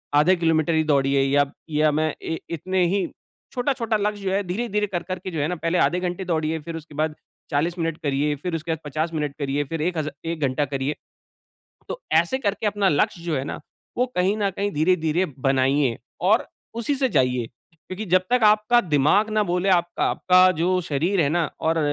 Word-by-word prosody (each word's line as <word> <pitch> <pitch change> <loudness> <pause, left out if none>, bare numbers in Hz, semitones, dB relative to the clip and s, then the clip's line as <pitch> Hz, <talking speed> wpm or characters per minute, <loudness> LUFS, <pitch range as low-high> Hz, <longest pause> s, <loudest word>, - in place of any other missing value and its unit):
आधे 155 +6 +5
किलोमीटर 165 -1 +1
ही 160 0 +3
दौड़िए 140 -2 +2
या 140 +1 +3 0.2
या 155 0 +2
मैं 155 +1 0
इ 160 - -3
इतने 180 +3 0
ही 195 +2 0 0.5
छोटा-छोटा 245 -4 0
लक्ष्य 205 0 -2
जो 190 - -1
है 200 +1 +1
धीरे-धीरे 210 +2 -1
कर-कर 185 0 -4
के 185 +1 -6
जो 160 - -3
है 145 - +1
ना, 180 - -2
पहले 165 +2 -1
आधे 180 0 +2
घंटे 180 +1 -3
दौड़िए 160 -2 -1
फिर 165 +2 -7
उसके 155 -2 -10
बाद 155 0 -1 0.4
40 165 +5 0
मिनट 165 -1 -1
करिए 145 +1 0
फिर 165 +4 -4
उसके 165 +1 -3
बाद 160 - -2
50 155 +3 -2
मिनट 150 -3 -2
करिए 140 0 -1
फिर 160 +3 -4
1 175 +2 -1
हज़ा 155 -1 -2
1 165 0 -3
घंटा 140 +1 +1
करिए। 135 +1 -2 0.9
तो - - -5
ऐसे 170 +11 +3
करके 205 -4 -1
अपना 205 -1 +2
लक्ष्य 170 +2 +1
जो 165 -3 -1
है 130 - -1
ना, 145 - -5 0.4
वो 250 - +3
कहीं 185 +3 +2
न 200 -2 +1
कहीं 200 +1 -1
धीरे-धीरे 160 +2 +1
बनाइए 135 -1 +2 0.2
और 210 +6 +3 0.3
उसी 235 +5 -1
से 265 -1 +1
जाइए, 125 - +1 0.3
क्योंकि 185 +6 -7
जब 185 0 +3
तक 250 -1 +3
आपका 215 +3 +5
दिमाग 170 - +2
ना 215 0 +2
बोले 180 +2 0
आपका 175 -1 +1
आपका 185 0 +5
जो 180 +2 +2
शरीर 170 +5 0
है 145 - +3
ना 170 0 0
और 165 +1 +1
170 Hz, 205 wpm, -23 LUFS, 150-190 Hz, 0.9 s, आधे